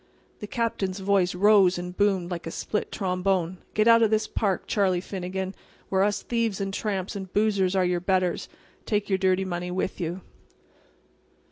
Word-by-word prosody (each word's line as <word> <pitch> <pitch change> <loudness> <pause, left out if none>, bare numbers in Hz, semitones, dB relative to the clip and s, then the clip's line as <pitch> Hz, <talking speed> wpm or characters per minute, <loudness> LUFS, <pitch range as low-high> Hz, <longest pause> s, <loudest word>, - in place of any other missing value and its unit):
The 210 - -6
Captain's 205 -5 -2
voice 190 -2 +2
rose 195 -1 +5
and 180 0 -6
boomed 190 -3 +1
like 170 -2 -4
a - - -2
split 210 +5 -3
trombone. 185 -2 -1 0.2
"Get 215 +1 +3
out 230 0 +7
of 225 - +4
this 215 0 +1
park, 195 -4 -1
Charlie 190 -4 +1
Finnegan, 190 0 -4 0.4
where 190 -1 +2
us 205 +1 +1
thieves 230 -4 -1
and 195 0 -3
tramps 195 -2 -2
and 190 -2 -6
boozers 200 -3 +2
are 185 -1 +3
your 180 -1 +1
betters; 185 0 0 0.3
and - - -35
take 205 -1 0
your 190 -1 +1
dirty 190 0 +2
money 175 -1 -3
with 185 0 -3
you." 175 +3 -3
190 Hz, 175 wpm, -26 LUFS, 180-205 Hz, 0.4 s, out